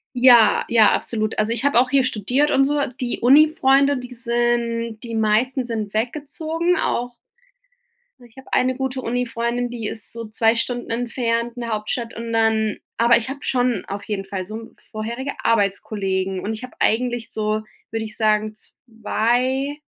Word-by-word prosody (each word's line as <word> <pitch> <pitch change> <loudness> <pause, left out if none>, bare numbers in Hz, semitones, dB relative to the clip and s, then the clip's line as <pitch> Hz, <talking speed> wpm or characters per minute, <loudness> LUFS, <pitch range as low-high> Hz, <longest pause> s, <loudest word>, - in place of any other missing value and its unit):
Ja, 245 -3 +6
ja, 225 -3 +5
absolut. 215 -2 -1
Also, 215 +2 +1
ich 240 - -3
habe 285 -4 +4
auch 250 +1 +2
hier 270 0 +3
studiert 255 +6 +1
und 270 - +4
so. 295 +2 0 0.2
Die 245 -2 -2
Uni-Freunde, 280 0 +5
die 250 0 -8
sind 235 -2 -1
die 230 -1 -5
meisten 225 +4 +1
sind 220 -4 -4
weggezogen, 310 +8 -1
auch 245 +1 -1 1.1
Ich 240 0 -19
habe 265 - -13
eine 255 0 +2
gute 265 -1 -3
Uni-Freundin, 240 0 -2
die 230 -3 -5
ist 220 - -5
so 230 0 -6
2 225 +1 +2
Stunden 240 +1 -2
entfernt 235 0 -1
'ne 235 -1 -4
Hauptstadt 225 +2 -3
und 230 0 -5
dann 220 -1 +2 0.2
aber 235 0 +5
ich 235 +1 -3
habe 275 +1 -5
schon 245 -6 0
auf 200 +1 -6
jeden 205 -2 -4
Fall 195 -1 -5
so 220 +3 -9 0.2
vorherige 235 +5 -4
Arbeitskollegen 195 -3 0
und 215 +4 -3
ich 220 - -7
habe 255 - -9
eigentlich 240 0 0
so, 215 0 -1 0.3
würde 225 0 -3
ich 215 - -8
sagen, 215 -1 +1
2- 245 +6 -2
235 Hz, 165 wpm, -21 LUFS, 220-255 Hz, 1.1 s, Ja